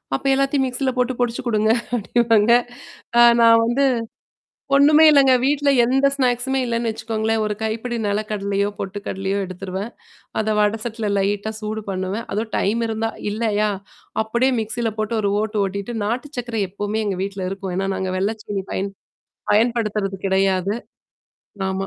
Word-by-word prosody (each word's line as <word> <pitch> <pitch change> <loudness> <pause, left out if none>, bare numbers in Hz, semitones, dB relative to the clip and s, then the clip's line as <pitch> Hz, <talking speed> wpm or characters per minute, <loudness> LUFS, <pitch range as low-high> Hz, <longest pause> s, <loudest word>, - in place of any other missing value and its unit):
அப்ப - - -5
எல்லாத்தையும் 275 0 +1
மிக்ஸியில 260 +1 -1
போட்டு 250 +1 +1
பொடிச்சு 240 -1 0
குடுங்க 215 -2 +1 0.3
அப்டிவாங்க. 225 0 +2 0.7
அ - - +8 0.2
நான் 230 0 +6
வந்து, 260 +4 +2 0.9
ஒண்ணுமே 300 +3 +6
இல்லங்க 275 -3 +6
வீட்ல 285 0 +2 0.2
எந்த 270 +3 +3
ஸ்நாக்ஸ்மே 260 0 +1
இல்லன்னு 235 -1 -1
வச்சுக்கோங்களேன். 220 0 -1
ஒரு 210 - -1
கைப்பிடி 230 +2 -2
நெல 205 +1 0
கடலையோ, 200 -1 0
பொட்டு 195 +1 -4
கடலையோ 195 +1 -2
எடுத்துருவேன். 190 +4 -6 0.5
அத 215 0 0
வடசட்டில 220 +1 -1
லைட்டா 205 +2 -1
சூடு 215 0 -4
பண்ணுவேன். 190 +4 -3
அதவும் 220 +2 -3
டைம் 225 +4 0
இருந்தா 225 0 -1 0.2
இல்லயா? 215 -1 0 0.5
அப்டியே 240 +4 +1
மிக்ஸில 225 +1 -2
போட்டு 215 +1 -1
ஒரு 200 - +1
ஓட்டு 215 -1 -2
ஓட்டிட்டு 200 +4 -5
நாட்டு 245 +6 -2
சர்க்கரை 235 -3 -2
எப்போமே 205 +2 -3
எங்க 195 -2 -2
வீட்ல 195 -1 -4
இருக்கும். 195 -1 -5
ஏன்னா 195 +1 -1
நாங்க 190 0 -2
வெள்ளைச்சீனி 205 0 -3
பயன் 195 +1 -2 0.6
பயன்படுத்துறது 210 -3 +1
கிடையாது. 190 0 +1 0.9
ஆமா. 190 0 -2
220 Hz, 145 wpm, -21 LUFS, 200-240 Hz, 0.9 s, அ